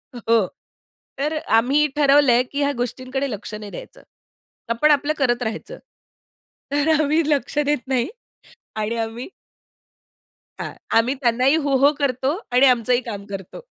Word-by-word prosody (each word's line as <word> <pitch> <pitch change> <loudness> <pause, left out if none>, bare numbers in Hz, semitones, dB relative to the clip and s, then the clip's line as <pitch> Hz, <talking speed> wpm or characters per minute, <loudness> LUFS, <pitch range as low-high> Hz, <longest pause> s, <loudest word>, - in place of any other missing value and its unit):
हो. 230 -4 +2 0.7
तर 295 +3 -1
अ, 310 - -1 0.2
आम्ही 280 +6 +3
ठरवलंय, 275 -4 +5
की 280 +3 -6
ह्या 285 0 +2
गोष्टींकडे 255 +3 -4
लक्ष 210 0 -7
नाही 210 -1 -8
द्यायचं. - - -11 0.7
आपण 235 +7 +3
आपलं 290 +1 +2
करत 245 -3 +1
राहायचं. 225 - -5 1.0
तर 290 +2 +1
आम्ही 310 +3 +2
लक्ष 290 0 -1
देत 295 -3 +2
नाही 250 -2 +1 0.7
आणि 215 +2 -2
आम्ही 225 +4 -4 1.3
हां, - - -5 0.2
आम्ही 240 +4 +3
त्यांनाही 255 +3 +3
हो, 285 -4 +1
हो. 280 +3 +5
करतो, 270 +2 0
आणि 250 +2 +5
आमचंही 250 -1 +3
काम 205 -4 -7
करतो. 195 - -8
255 Hz, 140 wpm, -21 LUFS, 230-285 Hz, 1.3 s, ठरवलंय